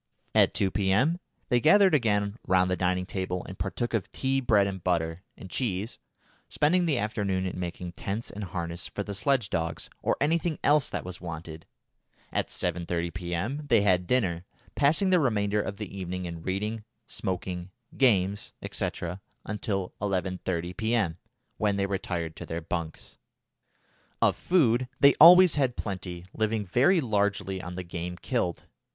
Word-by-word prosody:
At -, -, +4 dB
2 100 Hz, -3 st, +1 dB
P.M. 105 Hz, -, +2 dB, 0.3 s
they 125 Hz, -, +4 dB
gathered 190 Hz, +6 st, +6 dB
again 105 Hz, -5 st, +1 dB
round 90 Hz, 0 st, +3 dB
the -, -, +2 dB
dining 90 Hz, 0 st, 0 dB
table 90 Hz, -1 st, -3 dB
and 95 Hz, -, -9 dB
partook 100 Hz, +6 st, -2 dB
of 110 Hz, -5 st, -1 dB
tea, 135 Hz, 0 st, 0 dB
bread 105 Hz, -5 st, +4 dB
and 95 Hz, -3 st, -4 dB
butter, 85 Hz, -1 st, 0 dB, 0.2 s
and -, -, -9 dB
cheese, 105 Hz, -1 st, -2 dB, 0.5 s
spending 175 Hz, +4 st, +2 dB
the 145 Hz, -5 st, +2 dB
afternoon 100 Hz, -4 st, -1 dB
in 90 Hz, -1 st, -4 dB
making 90 Hz, 0 st, -5 dB
tents 100 Hz, +6 st, -4 dB
and 105 Hz, 0 st, -5 dB
harness 85 Hz, -1 st, -4 dB
for 100 Hz, -, -4 dB
the 100 Hz, -, -5 dB
sledge 120 Hz, +2 st, +1 dB
dogs, 80 Hz, -1 st, -3 dB
or -, -, +1 dB
anything 160 Hz, +2 st, +1 dB
else 145 Hz, -2 st, +4 dB
that -, -, -4 dB
was 90 Hz, -1 st, -7 dB
wanted. 80 Hz, -2 st, -7 dB, 0.7 s
At -, -, 0 dB
7.30 85 Hz, -1 st, -2 dB
P.M. 95 Hz, -, -3 dB
they 110 Hz, -, +4 dB
had 90 Hz, -3 st, +2 dB
dinner, 95 Hz, -9 st, +1 dB, 0.3 s
passing 160 Hz, +7 st, +3 dB
the 180 Hz, -, +5 dB
remainder 105 Hz, -6 st, +1 dB
of 100 Hz, 0 st, -5 dB
the 105 Hz, -2 st, -7 dB
evening 90 Hz, -1 st, -4 dB
in 85 Hz, -1 st, -6 dB
reading, 105 Hz, +5 st, -3 dB, 0.2 s
smoking, 90 Hz, -3 st, -4 dB, 0.3 s
games, 100 Hz, -6 st, +2 dB, 0.2 s
&c., -, -, -1 dB, 0.6 s
until 100 Hz, -3 st, -3 dB
11.30 90 Hz, -3 st, -2 dB
P.M., 110 Hz, -7 st, 0 dB, 0.4 s
when 105 Hz, -2 st, +1 dB
they 100 Hz, 0 st, +1 dB
retired 90 Hz, -4 st, -3 dB
to -, -, -8 dB
their 80 Hz, -, -3 dB
bunks. 80 Hz, -1 st, -5 dB, 1.0 s
Of -, -, +3 dB
food 130 Hz, -9 st, +2 dB
they 140 Hz, 0 st, +7 dB
always 180 Hz, +1 st, +10 dB
had 125 Hz, -3 st, 0 dB
plenty, 90 Hz, -3 st, -5 dB
living 110 Hz, -1 st, -1 dB
very 135 Hz, -, +3 dB
largely 100 Hz, -5 st, 0 dB
on 90 Hz, 0 st, -7 dB
the 90 Hz, -, -4 dB
game 85 Hz, 0 st, -5 dB
killed. 90 Hz, -6 st, -2 dB
100 Hz, 160 wpm, -28 LUFS, 90-120 Hz, 1.0 s, always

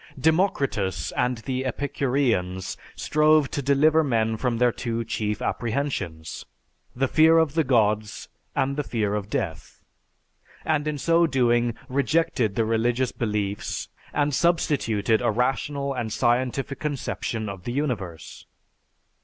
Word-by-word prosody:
"_) -, -, -9 dB
Democritus 140 Hz, -, +1 dB
and 125 Hz, 0 st, 0 dB
the 130 Hz, -1 st, -2 dB
Epicureans 130 Hz, -9 st, -1 dB, 0.2 s
strove 155 Hz, -1 st, +3 dB
to 145 Hz, -, -2 dB
deliver 150 Hz, +4 st, +4 dB
men 115 Hz, -5 st, +1 dB
from 120 Hz, +1 st, -1 dB
their 125 Hz, 0 st, +3 dB
two 115 Hz, 0 st, -3 dB
chief 105 Hz, -1 st, -2 dB
apprehensions: 110 Hz, -, -3 dB, 0.5 s
the 135 Hz, +2 st, +1 dB
fear 160 Hz, +4 st, +5 dB
of 160 Hz, -3 st, +3 dB
the 160 Hz, 0 st, +2 dB
gods, 110 Hz, -5 st, +1 dB, 0.3 s
and 140 Hz, +1 st, 0 dB
the 150 Hz, -, 0 dB
fear 110 Hz, -6 st, -1 dB
of 105 Hz, -1 st, -3 dB
death; 80 Hz, -6 st, -4 dB, 0.8 s
and 155 Hz, -1 st, +1 dB
in 150 Hz, -1 st, -1 dB
so 170 Hz, +3 st, +3 dB
doing 120 Hz, -4 st, +2 dB
rejected 140 Hz, -5 st, +1 dB
the 115 Hz, -, +1 dB
religious 120 Hz, +3 st, +1 dB
beliefs 105 Hz, -3 st, -3 dB, 0.2 s
and 145 Hz, 0 st, 0 dB
substituted 125 Hz, -, +1 dB
a 120 Hz, -, +2 dB
rational 135 Hz, +4 st, -1 dB
and 120 Hz, -4 st, -3 dB
scientific 125 Hz, +4 st, 0 dB
conception 130 Hz, -6 st, -3 dB
of 95 Hz, -3 st, -7 dB
the -, -, -2 dB
universe. 110 Hz, -, -4 dB
125 Hz, 130 wpm, -25 LUFS, 110-145 Hz, 0.8 s, fear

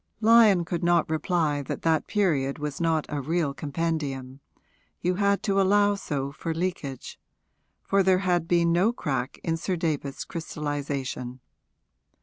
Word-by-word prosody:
Lyon 220 Hz, -5 st, +6 dB
could 175 Hz, +1 st, -3 dB
not 170 Hz, -1 st, +3 dB
reply 155 Hz, -2 st, 0 dB
that 140 Hz, -, -5 dB
that 160 Hz, -2 st, +1 dB
period 150 Hz, -10 st, +1 dB
was 150 Hz, 0 st, -4 dB
not 165 Hz, -2 st, +1 dB
a 145 Hz, -1 st, -3 dB
real 155 Hz, 0 st, 0 dB
compendium 145 Hz, -3 st, -3 dB, 0.6 s
you 180 Hz, +1 st, 0 dB
had 200 Hz, +1 st, +1 dB
to 195 Hz, -1 st, +2 dB
allow 205 Hz, +1 st, +4 dB
so 140 Hz, -8 st, -3 dB
for 165 Hz, +3 st, -4 dB
leakage; 165 Hz, -7 st, -4 dB, 0.6 s
for 195 Hz, 0 st, +2 dB
there 190 Hz, -1 st, +4 dB
had 175 Hz, -2 st, +1 dB
been 170 Hz, -1 st, +3 dB
no 180 Hz, +7 st, +3 dB
crack 135 Hz, -, -3 dB
in 165 Hz, -1 st, 0 dB
Sir 185 Hz, +3 st, -2 dB
David's 150 Hz, -5 st, -3 dB
crystallisation. 145 Hz, -5 st, -4 dB
165 Hz, 140 wpm, -26 LUFS, 145-180 Hz, 0.6 s, Lyon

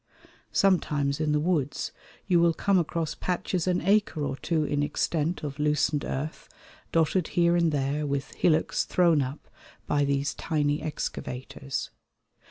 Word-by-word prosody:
Sometimes 150 Hz, -8 st, +2 dB
in 155 Hz, -1 st, +1 dB
the 150 Hz, -, +2 dB
woods 150 Hz, -4 st, -1 dB, 0.3 s
you 180 Hz, -3 st, +3 dB
will 170 Hz, -1 st, +4 dB
come 195 Hz, +1 st, +3 dB
across 165 Hz, -1 st, -2 dB
patches 180 Hz, -1 st, -2 dB
an 180 Hz, -1 st, +2 dB
acre 195 Hz, -5 st, +2 dB
or 135 Hz, -, -2 dB
two 160 Hz, +2 st, 0 dB
in 145 Hz, -1 st, 0 dB
extent 155 Hz, +3 st, -1 dB
of 145 Hz, -1 st, -5 dB
loosened 150 Hz, 0 st, +1 dB
earth 150 Hz, +4 st, -4 dB, 0.4 s
dotted 165 Hz, +1 st, +2 dB
here 170 Hz, 0 st, +4 dB
and 170 Hz, -2 st, +3 dB
there 145 Hz, +1 st, -1 dB
with 140 Hz, -1 st, -3 dB
hillocks 160 Hz, -2 st, +2 dB
thrown 170 Hz, -5 st, +3 dB
up 135 Hz, +3 st, -5 dB, 0.4 s
by 145 Hz, -1 st, +1 dB
these 140 Hz, 0 st, 0 dB
tiny 150 Hz, -2 st, 0 dB
excavators. 135 Hz, -2 st, -4 dB
155 Hz, 145 wpm, -27 LUFS, 145-170 Hz, 0.4 s, will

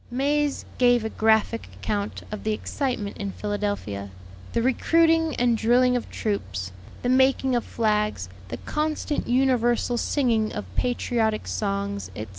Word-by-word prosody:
May's 285 Hz, +3 st, 0 dB
gave 245 Hz, -2 st, +4 dB
a -, -, -1 dB
graphic 220 Hz, +1 st, +2 dB
account 205 Hz, -1 st, -3 dB
of 210 Hz, -, -5 dB
the 215 Hz, -, 0 dB
excitement 235 Hz, -3 st, -3 dB
in 200 Hz, -1 st, -4 dB
Philadelphia; 205 Hz, -, -3 dB, 0.4 s
the 230 Hz, -, +1 dB
recruiting 325 Hz, +4 st, +3 dB
and 240 Hz, -1 st, +2 dB
drilling 245 Hz, +3 st, +3 dB
of 245 Hz, -, -3 dB
troops, 95 Hz, -, -3 dB, 0.3 s
the -, -, 0 dB
making 260 Hz, 0 st, +3 dB
of 240 Hz, -, +1 dB
flags, 210 Hz, -, 0 dB, 0.2 s
the -, -, -5 dB
constant, 305 Hz, 0 st, -2 dB
universal 245 Hz, -1 st, +2 dB
singing 230 Hz, -7 st, +1 dB
of 210 Hz, -, -4 dB
patriotic 235 Hz, -3 st, 0 dB
songs, 200 Hz, -1 st, -2 dB
etc. 105 Hz, -1 st, -6 dB
230 Hz, 135 wpm, -25 LUFS, 210-255 Hz, 0.4 s, gave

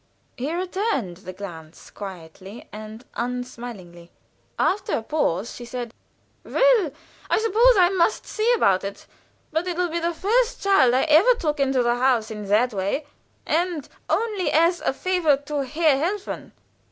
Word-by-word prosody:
He 270 Hz, +4 st, -3 dB
returned 360 Hz, -, -2 dB
the 185 Hz, 0 st, -9 dB
glance 170 Hz, -4 st, -10 dB
quietly 190 Hz, +2 st, -10 dB
and 215 Hz, +3 st, -9 dB
unsmilingly. 235 Hz, -8 st, -6 dB, 0.5 s
After 405 Hz, -, 0 dB
a 225 Hz, -, -5 dB
pause 220 Hz, -, -1 dB
she 245 Hz, -, -9 dB
said: 240 Hz, -1 st, -6 dB, 0.5 s
"Well, -, -, +3 dB, 0.4 s
I -, -, +3 dB
suppose 455 Hz, +2 st, +4 dB
I 355 Hz, -2 st, +6 dB
must 380 Hz, +2 st, +1 dB
see 445 Hz, +2 st, 0 dB
about 195 Hz, -, +3 dB
it, 200 Hz, 0 st, -6 dB, 0.5 s
but 320 Hz, +3 st, -1 dB
it 350 Hz, -1 st, -2 dB
will 355 Hz, -1 st, +1 dB
be 335 Hz, +1 st, -2 dB
the 340 Hz, 0 st, -1 dB
first 470 Hz, +7 st, +1 dB
child 325 Hz, -12 st, +4 dB
I 260 Hz, -, +3 dB
ever 330 Hz, +11 st, +5 dB
took 305 Hz, -8 st, -2 dB
into 270 Hz, -2 st, +2 dB
the 240 Hz, 0 st, +1 dB
house, 245 Hz, -4 st, +2 dB
in 210 Hz, -2 st, -6 dB
that 220 Hz, +4 st, +2 dB
way, 200 Hz, +9 st, -2 dB, 0.4 s
and 330 Hz, -2 st, -1 dB, 0.2 s
only 425 Hz, -5 st, 0 dB
as 335 Hz, +3 st, +3 dB
a -, -, +1 dB
favor 330 Hz, -1 st, +1 dB
to 285 Hz, 0 st, -3 dB
Herr 305 Hz, +1 st, +2 dB
Helfen." 395 Hz, +3 st, -4 dB
280 Hz, 155 wpm, -23 LUFS, 220-360 Hz, 0.5 s, I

